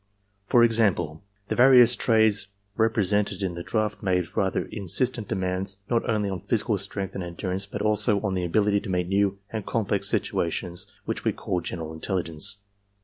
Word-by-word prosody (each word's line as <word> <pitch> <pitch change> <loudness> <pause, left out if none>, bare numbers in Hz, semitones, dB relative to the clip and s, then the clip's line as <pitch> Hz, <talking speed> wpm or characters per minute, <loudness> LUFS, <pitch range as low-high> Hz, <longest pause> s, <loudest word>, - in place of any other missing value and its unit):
"For 120 +2 +5
example, 100 -9 +2 0.3
the - - 0
various 125 -1 +7
trades 110 -4 +3 0.3
represented 105 -3 +1
in 95 -2 -1
the 85 - -6
draft 110 +3 -1
made 90 -3 -1
rather - - 0
insistent 110 +3 -2
demands 95 -1 -2
not 115 -1 +1
only 105 -3 +1
on 95 -2 -3
physical 105 +1 0
strength 100 -1 -4
and 95 - -4
endurance 90 +3 -3
but 105 0 -4
also 105 -1 +2
on 100 -3 -1
that 90 -1 -1
ability 100 +3 +2
to - - -7
meet 90 -1 0
new 100 0 +2
and 110 -2 -3
complex 100 -3 -1
situations 85 0 -2
which - - -3
we - - +1
call 90 - -2
general 80 -2 -5
intelligence. 85 +1 -2
100 Hz, 165 wpm, -26 LUFS, 90-110 Hz, 0.3 s, various